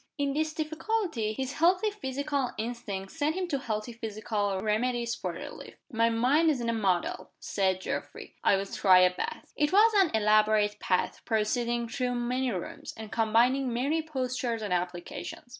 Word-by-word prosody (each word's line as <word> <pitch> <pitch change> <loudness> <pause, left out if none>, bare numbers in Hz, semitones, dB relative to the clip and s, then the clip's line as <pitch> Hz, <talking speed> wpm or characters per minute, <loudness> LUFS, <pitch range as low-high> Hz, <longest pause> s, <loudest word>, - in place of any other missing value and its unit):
In 280 -1 0
this 310 +1 -1
difficulty, 315 - -1
his 265 +4 -3
healthy 360 +7 +3
physical 280 -7 -2
instincts 215 -4 -5
sent 310 0 0
him 370 -1 -2
to 280 -4 0
healthy 220 -1 -3
physical 215 -3 -2
remedies 235 +3 0
for - - -3
relief. - - -9 0.2
"My 230 -1 +3
mind's 270 +6 +3
in 235 -1 -2
a - - +1
muddle," 190 -6 -1
said 190 -2 0
Geoffrey. - - -5
"I'll 195 0 +3
try 190 -2 +5
a 180 0 +5
bath." - - -5
It 295 +1 +1
was 435 +4 +6
an 380 -4 +5
elaborate 215 -1 +3
bath, 180 - 0
proceeding 235 +2 0
through 245 +1 -2
many 250 +2 0
rooms, 180 -4 -6
and 220 -1 -8
combining 240 +4 +2
many 280 +7 0
postures 255 -6 -2
and 200 -3 -1
applications. 175 +6 -4
235 Hz, 160 wpm, -29 LUFS, 215-280 Hz, 0.2 s, was